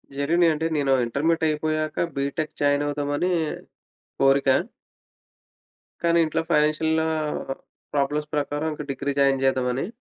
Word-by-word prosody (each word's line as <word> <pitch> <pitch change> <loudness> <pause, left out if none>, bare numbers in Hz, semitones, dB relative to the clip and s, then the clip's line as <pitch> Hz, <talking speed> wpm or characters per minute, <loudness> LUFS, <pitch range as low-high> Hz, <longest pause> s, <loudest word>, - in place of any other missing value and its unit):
జరిగినియి 165 +4 +3
అంటే, 160 +2 -2
నేనో 140 -2 +2
ఇంటర్మీడియేట్టయిపోయాక 155 +3 0
బీటెక్ 140 +3 -2
జాయినవుదామని 145 +3 0 0.9
కోరిక 135 0 +4 1.5
కానీ 170 0 +3
ఇంట్లో 160 +1 -1
ఫైనాన్షియల్‌‌లా 160 +1 +2 0.9
ప్రాబ్లమ్స్ 150 +1 0
ప్రకారం 145 +2 -1
ఇక 150 - -6
డిగ్రీ 140 +1 -2
జాయిన్ 135 -1 +3
చేద్దామని. 130 +3 0
150 Hz, 95 wpm, -24 LUFS, 140-160 Hz, 1.5 s, కోరిక